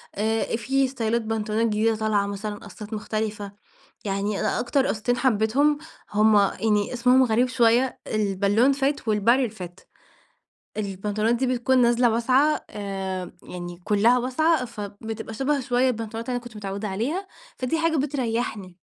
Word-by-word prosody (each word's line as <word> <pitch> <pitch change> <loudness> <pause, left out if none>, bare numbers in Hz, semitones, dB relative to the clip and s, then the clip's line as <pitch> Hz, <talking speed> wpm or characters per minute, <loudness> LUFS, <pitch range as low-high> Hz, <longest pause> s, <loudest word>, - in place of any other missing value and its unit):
آآ 220 +2 0
فيه 265 +4 +1
ستايلات 235 -3 -1
بنطلونات 220 0 -1
جديدة 220 +1 +1
طالعة 215 -2 +1
مثلًا، 205 +1 -4
قصات 210 +1 -10
مختلفة، 215 -1 -3 0.5
يعني 200 +1 -1
أ - - 0
أكتر 265 +2 +1
قصتين 245 +3 0
حبيتهم، 260 +5 +2 0.3
هُم 210 0 +4
يعني 205 +1 +1
اسمهم 250 +2 +4
غريب 240 +1 +2
شوية، 245 +1 +2
البالون 205 +4 +2
فِت 275 -1 -1
و - - +3
الباريل 235 +4 +3
فِت 180 -3 -10 0.9
البنطلونات 210 +3 -1
دي 260 +2 0
بتكون 255 +1 +2
نازلة 240 0 +4
واسعة، 260 +6 +2
آآ، 190 -3 -4
يعني 175 -1 -7
كلها 215 +5 +4
واسعة، 260 +3 +1
فبتبقى 220 0 -7
شبه 275 +5 0
شوية 250 0 +1
البنطلونات 225 0 -4
اللي 250 - -1
أنا 240 - -7
كنت 240 -2 -11
متعودة 200 0 -4
عليها، 275 - -2 0.3
فدي 255 +6 -1
حاجة 325 -1 +1
بتريحني. 235 - -2
225 Hz, 145 wpm, -24 LUFS, 210-255 Hz, 0.9 s, هُم